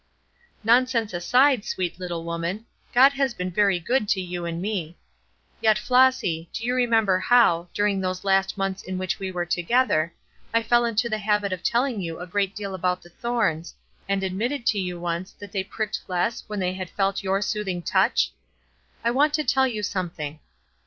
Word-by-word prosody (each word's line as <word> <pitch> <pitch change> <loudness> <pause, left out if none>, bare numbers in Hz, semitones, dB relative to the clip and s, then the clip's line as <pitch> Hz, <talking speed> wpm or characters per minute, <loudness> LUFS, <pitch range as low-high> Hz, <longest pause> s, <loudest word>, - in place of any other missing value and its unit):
"Nonsense 235 -2 +3
aside, 245 +7 +3
sweet 180 -3 -3
little 175 -2 -4
woman, 170 +6 -3 0.3
God 265 +3 +6
has 270 -3 0
been 180 -1 -3
very 195 0 +2
good 215 +4 0
to 195 - +2
you 175 -1 -4
and 170 0 -3
me. 180 -4 -3 0.6
Yet, 220 -1 +4
Flossy, 250 -9 +2
do 225 - -5
you 250 - +1
remember 225 -6 +3
how, 185 -5 +4
during 205 -2 +1
those 185 0 -3
last 195 0 +2
months 195 -1 -2
in 185 0 -5
which 185 0 -2
we 190 -1 -4
were 175 -1 -2
together, 175 -2 +1 0.4
I 230 - +3
fell 240 +1 +3
into 230 0 +1
the 215 -2 -2
habit 210 -2 +1
of 180 - -5
telling 240 -1 0
you 165 -2 -5
a 180 - -5
great 195 +2 -1
deal 200 -2 -5
about 180 0 -1
the 175 - -15
thorns, 200 -6 -2 0.3
and 195 -1 0
admitted 230 +8 -2
to 210 - +2
you 180 -2 -3
once 175 +2 -3
that 205 -2 -11
they 195 -2 -1
pricked 215 +2 -4
less 185 +5 -1
when 210 -1 -4
they 185 -1 0
had 185 -1 -6
felt 195 +1 0
your 195 0 0
smoothing 195 -4 -2
touch? - - +2 0.7
I 235 - +2
want 290 +4 +3
to 305 - 0
tell 265 -2 +3
you 215 -4 -4
something. 165 -6 -4
195 Hz, 185 wpm, -24 LUFS, 180-230 Hz, 0.7 s, God